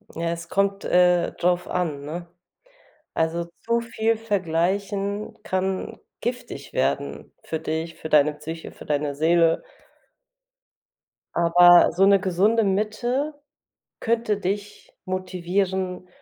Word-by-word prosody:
Ja, 165 0 -1
es 170 0 -6
kommt, 200 0 0
äh, 180 -1 +3
drauf 180 0 0
an, 160 -6 -2
ne? 170 +4 -6 0.9
Also 165 +1 0 0.2
zu 235 0 +2
viel 230 -1 0
vergleichen 200 +1 -1
kann 190 0 -2 0.2
giftig 245 +1 -5
werden - - -1
für 160 - -3
dich, 160 +1 -3
für 160 - -7
deine 150 0 +4
Psyche, 160 +2 -8
für - - -13
deine 145 -1 -1
Seele. 165 +2 +3 1.7
Aber 175 +1 +7
so 190 +2 +3
'ne 200 0 +6
gesunde 195 +5 +2
Mitte 230 +9 0 0.7
könnte 230 -2 0
dich 205 +1 -5
motivieren, 185 0 -2
185 Hz, 110 wpm, -24 LUFS, 170-205 Hz, 1.7 s, Aber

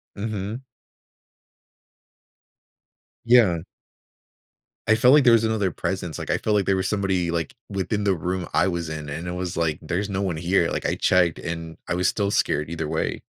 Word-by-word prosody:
Mhm. 105 +2 -4 2.6
Yeah. 115 -8 +5 1.3
I 110 - +5
felt 125 +4 +5
like 150 -1 +6
there 120 -2 +6
was 115 -1 +4
another 110 -4 0
presence, 90 -2 -3
like, - - -6
I - - +2
felt 105 - 0
like 100 -2 +2
there 95 - +2
was 95 0 -1
somebody, 95 -4 0
like, 85 -1 -3
within 100 +1 -2
the 100 -2 +3
room 90 +1 -3
I 90 - +3
was 85 -3 -2
in, 75 -1 -6
and 80 +5 -5
it 90 - -3
was 90 0 -4
like, 80 -2 0
"There's 90 +6 -2
no 100 0 -2
one 90 -5 -1
here, 85 +1 +1
like, - - -3
I - - +1
checked," 90 -3 +2
and 85 -1 -6
I - - -1
was 90 +1 +1
still 100 -1 0
scared 75 -6 0
either 80 -2 -3
way. 80 +1 -2
90 Hz, 185 wpm, -24 LUFS, 85-100 Hz, 2.6 s, like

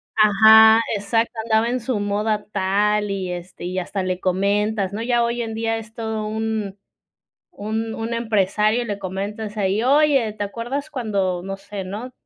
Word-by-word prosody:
Ajá, 220 +1 +7 0.2
exacto, 225 +3 0
andaba 220 0 +2
en 250 +1 -1
su 235 -2 -2
moda 210 +1 -1
tal, 205 +2 +1
y 190 -2 -3
este, 175 0 -8
y 185 +1 -2
hasta 190 +2 -3
le 185 0 -2
comentas, 200 +2 0
¿no? 215 - -4
Ya 240 0 +1
hoy 235 +1 -2
en 225 -1 -4
día 225 0 -1
es 220 -1 -10
todo 220 -1 -4
un 215 -2 -3 0.8
un 220 +2 -3
un 225 +1 -4
empresario 215 +1 +1
le 205 -3 -4
comentas 205 +3 -5
ahí: 200 +1 +1
"Oye, 275 -3 +3
te 210 - -4
acuerdas 240 +8 -4
cuando, 200 -8 -1
no 195 +1 -4
sé", 200 0 -7
¿no? 215 +7 -6
215 Hz, 165 wpm, -21 LUFS, 200-225 Hz, 0.8 s, Ajá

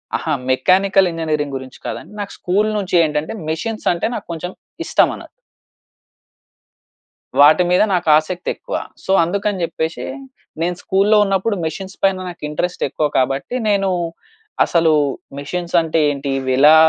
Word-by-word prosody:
అహా! 160 - -1 0.2
Mechanical 190 +8 +3
engineering 155 -4 -2
గురించి 130 0 -11
కాదండి. - - -6
నాకు 200 -1 -4
స్కూల్ 205 +4 +1
నుంచి 190 -3 -2
ఏంటంటే, 150 0 -1 0.2
మెషీన్స్ 215 +8 -3
అంటే 170 - -1
నాకు - - -6
కొంచెం 170 +2 -5 0.3
ఇష్టం - - +3
అన - - -10 2.2
వాటి 155 +5 +7
మీద 180 +3 +4
నాకు 180 -2 0
ఆసక్తి 175 +3 -3
ఎక్కువ. - - -6 0.3
సో, - - -1
అందుకని 195 +2 -1
చెప్పేసి 160 0 -3 0.6
నేను 175 +1 0
స్కూల్‌లో 200 +3 +3
ఉన్నప్పుడు 195 +2 0
మెషిన్స్ 190 +5 -5
పైన 195 -1 +3
నాకు 175 - -11
ఇంట్రెస్ట్ 175 +4 -2
ఎక్కువ. 150 +3 0
కాబట్టి 135 - 0
నేను 195 -1 +2 0.8
అసలు 165 -2 +3 0.5
మెషిన్స్ 175 +5 -4
అంటే 165 0 0
ఏంటి, 140 0 -4
ఇవి 130 -1 -2
ఎలా 150 +3 +8
175 Hz, 140 wpm, -19 LUFS, 155-195 Hz, 2.2 s, ఎలా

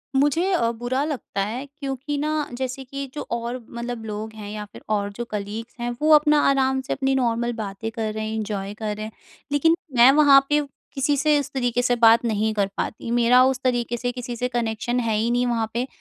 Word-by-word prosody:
मुझे 295 +7 +2
अ, 235 -10 +2
बुरा 245 +4 -2
लगता 285 -9 -3
है। 240 +6 -4
क्योंकि 280 0 -5
ना 300 0 -1
जैसे 260 +1 -4
कि 275 +2 -6
जो 295 - -5
और 235 +1 -3
मतलब 235 -1 -5
लोग 215 +1 -5
हैं 210 -2 -8
या 210 0 -5
फ़िर 205 - -14
और 205 -1 -1
जो 240 +4 -5
कलीग्स 210 +3 -5
हैं 240 0 -2
वो 310 +1 +3
अपना 300 0 +4
आराम 265 -1 +2
से 265 - -3
अपनी 270 -1 0
नॉर्मल 240 -2 0
बातें 215 -1 -5
कर 220 -1 -3
रहे 215 0 -3
हैं 220 - -4
एन्जॉय 205 -2 -3
कर 210 0 -4
रहे 215 +1 -5
हैं। 220 - -7 0.4
लेकिन 325 +3 +4 0.2
मैं 240 +2 +8
वहाँ 280 -1 +6
पे 295 0 +3 0.3
किसी 275 +1 +1
से 300 +1 +3
उस 285 - -4
तरीके 245 -2 0
से 245 0 +2
बात 230 +1 +7
नहीं 220 -1 0
कर 200 -2 +1
पाती 225 - -4
मेरा 240 +1 +5
उस 260 -1 +1
तरीके 240 -2 0
से 245 +1 -2
किसी 245 0 -6
से 250 +2 -1
कनेक्शन 240 0 -1
है 230 -3 0
ही 225 +2 +1
नहीं 245 +1 +2
वहाँ 230 -2 0
पे। 245 +3 -1
240 Hz, 220 wpm, -23 LUFS, 220-270 Hz, 0.4 s, मैं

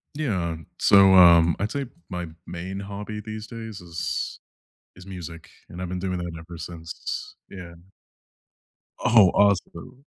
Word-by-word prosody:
Yeah, 95 - -1 0.2
so, 100 -1 +7
um, 85 -2 +7
I'd 105 +3 -1
say 140 -1 -2 0.2
my 90 -2 -4 0.2
main 95 +3 -6
hobby 105 +2 -6
these 110 0 -7
days 110 -4 -8
is 85 -1 -4 0.6
is 90 - -14
music, 85 -4 -9 0.2
and 90 - -9
I've 90 - -4
been 90 - -3
doing 90 0 -2
that 85 -1 -5
ever 85 +1 -10
since 80 0 -6
yeah. 90 -3 -9 1.3
Oh, 110 -5 +6
awesome. 100 +6 0
90 Hz, 135 wpm, -25 LUFS, 85-105 Hz, 1.3 s, so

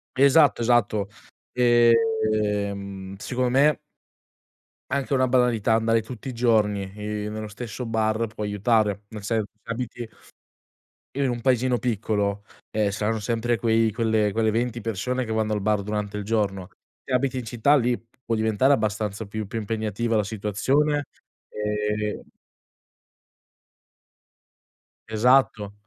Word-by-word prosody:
Esatto, 140 0 +5
esatto. 110 -4 +2 0.5
ehm 110 -6 +1
secondo 125 +4 -1
me 140 +4 +4 1.2
anche 140 0 -1
una 130 -1 +3
banalità 120 -4 +2
andare 115 0 +2
tutti 120 +3 -9
i 130 - -4
giorni, 110 -4 +2
ehm, 105 0 -4
nello 110 0 -5
stesso 115 +3 -6
bar 110 0 0
può 110 0 -7
aiutare. 105 0 +1
Nel 105 -1 -9
senso 110 +1 0 0.2
se 115 - -6
abiti 120 0 -4 1.1
in 140 -2 +1
un 120 -1 -3
paesino 125 0 +2
piccolo, 105 -3 -1 0.3
ehm, 105 -2 0
saranno 110 +2 -1
sempre 115 +2 0
quei 115 +1 +2
quelle 110 -1 +1
quelle 110 +2 +1
20 120 +2 -1
persone 115 +4 -2
che 110 - -3
vanno 110 -1 0
al 105 - 0
bar 105 0 +1
durante 105 0 -3
il 105 - -3
giorno. 100 -4 -1 0.3
Se - - -10
abiti 130 +1 +1
in 125 - -3
città 120 +5 +2
lì 125 -3 +1 0.2
può 115 - -1
diventare 110 +4 +2
abbastanza 105 -3 -1
più 110 +1 -5
più 115 +3 -4
impegnativa 110 +1 -2
la 105 - +3
situazione 130 +9 0 0.4
ehm 105 0 -2 2.9
Esatto. 110 -2 +2
110 Hz, 130 wpm, -24 LUFS, 105-120 Hz, 2.9 s, Esatto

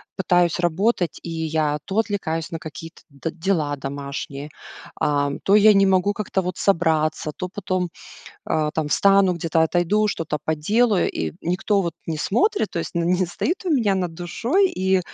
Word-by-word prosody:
пытаюсь 175 -2 +2
работать, 175 +1 0
и - - -6
я 160 -2 -1
то 195 +3 -1
отвлекаюсь 180 -7 -2
на 165 - -3
какие-то 165 +1 -10
д 140 +3 -5
дела 160 -5 -1
домашние, 140 +1 -6 0.5
а, 145 -1 +1
то 200 - +4
я 210 0 +7
не 195 0 +5
могу 190 +1 +2
как-то 200 -2 -2
вот 180 0 -4
собраться, 160 -4 +1
то 185 - -5
потом, 185 -3 -2 0.6
а, 155 -1 0
там 155 -2 -2
встану, 195 +2 +4
где-то 165 -1 +1
отойду, 175 +6 +2
что-то 160 -6 -2
поделаю, 205 +8 +2
и 80 -1 -3
никто 195 +4 +1
вот 170 -3 -2
не 160 - -2
смотрит, 365 - +1
то - - -4
есть, 165 - -5
н 170 0 0
не 180 0 +2
стоит 350 - -2
у 350 - 0
меня 225 -9 +2
над 180 -3 -2
душой, 240 - +1
и, 190 0 +1
175 Hz, 170 wpm, -22 LUFS, 160-200 Hz, 0.6 s, я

